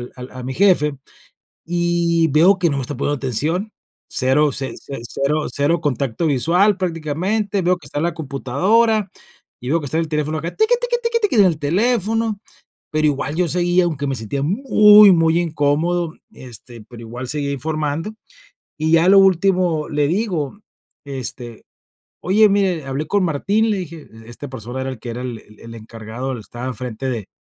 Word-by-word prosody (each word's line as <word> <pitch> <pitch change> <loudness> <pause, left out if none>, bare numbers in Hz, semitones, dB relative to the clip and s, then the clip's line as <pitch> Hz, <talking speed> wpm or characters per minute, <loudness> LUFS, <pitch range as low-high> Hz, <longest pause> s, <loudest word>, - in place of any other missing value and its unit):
al 125 0 -9
a 130 -1 -8
mi 130 +1 -4
jefe, 160 -6 +3 0.7
y 170 -1 +1
veo 170 +7 +5
que 175 -3 +1
no 140 - -1
me - - -1
está 145 - -5
poniendo 145 - -1
atención, 155 - -2 0.4
0, 140 +3 +2
0, 135 -3 -4 0.8
0 150 +4 0
contacto 140 +2 -1
visual 175 - +2
prácticamente, 185 +4 -2
veo 180 +1 +2
que - - -15
está - - -7
en - - -1
la 170 -1 0
computadora, 185 - +1 0.5
y 125 - -6
veo 165 +2 +2
que 145 - -7
está 155 +4 -2
en 165 - +1
el - - -6
teléfono 155 0 -1
acá, 170 - -6
tiki, 440 +3 +3
tiki, 485 -1 -1
tiki, 465 0 +1
tiki, 415 - +1
en 200 - +7
el 165 -4 +2
teléfono, 220 +5 0 0.5
pero 155 0 +1
igual 145 0 -1
yo 180 -2 +1
seguía, 175 +2 +2
aunque 150 -4 -2
me 135 - -1
sentía 125 +4 -4
muy 210 - +6
muy 165 0 +3
incómodo, 165 +2 0 0.2
este, 120 -2 -12
pero 120 -2 -11
igual 120 +3 -7
seguía 145 0 -2
informando. 155 - -3 0.6
Y 155 +1 0
ya 165 +1 +5
a - - +4
lo 195 - +7
último 185 -4 +2
le 145 -1 0
digo: 180 -4 -2 0.5
"Este, 125 -4 -7 0.6
oye, 210 +3 +4
mire, 190 -7 +1
hablé 135 +3 -3
con 200 +1 +1
Martín", 200 +8 +1
le 205 - 0
dije, 165 -4 -8 0.2
esta 120 +4 -9
persona 125 +1 -6
era 135 - -3
el 125 - -9
que, 120 - -6
era 120 +2 -6
el 120 -3 -5 0.2
el 115 0 -11
encargado, 115 +3 -6
estaba 120 +3 -8
en 130 - -3
frente 125 +1 -5
de 115 -6 -4
155 Hz, 180 wpm, -19 LUFS, 135-185 Hz, 0.8 s, en